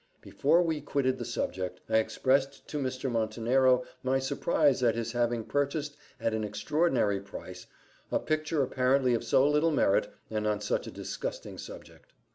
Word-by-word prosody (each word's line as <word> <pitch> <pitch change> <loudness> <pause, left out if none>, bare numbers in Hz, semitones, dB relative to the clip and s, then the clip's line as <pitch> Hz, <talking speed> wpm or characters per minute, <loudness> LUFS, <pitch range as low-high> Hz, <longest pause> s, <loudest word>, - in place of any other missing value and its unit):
Before 170 +5 +2
we 160 -3 -1
quitted 140 -2 0
the - - -4
subject, 90 -1 -3
I 110 - +3
expressed 135 +5 0
to 150 - -3
Mr. 130 -1 -2
Montenero 120 +3 +2 0.2
my 130 +1 +1
surprise 135 +1 +1
at 115 -2 +3
his 115 0 -2
having 120 -1 0
purchased, 145 +3 -1 0.2
at 115 - 0
an 110 0 -1
extraordinary 120 - +1
price, 90 -2 -10 0.4
a - - +3
picture 155 -1 0
apparently 130 0 +2
of 115 - 0
so 135 - +4
little 150 +3 +3
merit, 120 -10 +2 0.2
and 105 -1 -1
on 105 -1 +1
such - - -2
a - - -6
disgusting - - -6
subject. - - -11
130 Hz, 160 wpm, -29 LUFS, 110-145 Hz, 0.4 s, so